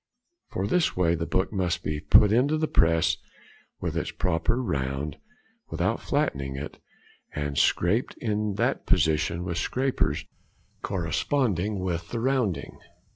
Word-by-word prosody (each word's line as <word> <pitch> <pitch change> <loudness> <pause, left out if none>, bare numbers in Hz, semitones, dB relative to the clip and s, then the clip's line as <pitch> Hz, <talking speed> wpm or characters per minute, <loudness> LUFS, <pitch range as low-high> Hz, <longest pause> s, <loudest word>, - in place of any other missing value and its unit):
For 95 - -2
this 160 - +1
way 85 -2 +3
the 85 0 -2
book 95 +3 0
must 90 -3 -1
be 75 0 -2
put 105 +6 +6
into 135 +7 +3
the 155 0 0
press 80 - +3 0.6
with - - -3
its - - -1
proper 90 +7 0
round, 70 - -2 0.5
without - - 0
flattening 65 -1 -1
it, 70 +2 -7 0.6
and 75 -1 -2
scraped 90 - +2
in 105 -3 -1
that - - 0
position 80 +2 +2
with 85 -1 -2
scrapers 125 - 0 0.6
corresponding 100 - 0
with 85 -2 -3
the 115 - -3
rounding. 125 -6 -1
90 Hz, 130 wpm, -26 LUFS, 80-110 Hz, 0.6 s, put